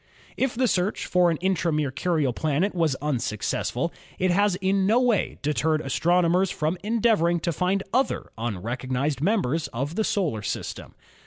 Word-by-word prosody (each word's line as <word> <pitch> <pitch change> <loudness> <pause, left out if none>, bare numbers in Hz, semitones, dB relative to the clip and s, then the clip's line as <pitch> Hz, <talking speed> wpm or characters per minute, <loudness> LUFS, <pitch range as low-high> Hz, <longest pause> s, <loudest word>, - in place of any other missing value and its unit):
If 265 -2 0
the 255 +1 +2
search 185 0 0
for 180 -1 +3
an 165 - 0
intra 185 -3 +1
Mercurial 150 -1 0
planet 155 - 0
was 165 -6 +1
unsuc 120 -8 -2
cessful, - - -1 0.3
it 185 0 +1
has 200 +1 +3
in 190 +1 +1
no 225 +4 +4
way 245 -6 +1
deterred 155 +1 +1
astronomers 175 +5 +2
from 155 +3 -2
en 225 +2 0
deavoring 175 -7 +3
to 170 - +1
find 185 +5 0
other 260 +3 0
unrecognised 125 +6 -2
members 165 - +1
of 135 +6 -4
the 220 - 0
solar 165 - 0
system. - - -5
170 Hz, 160 wpm, -25 LUFS, 145-195 Hz, 0.3 s, no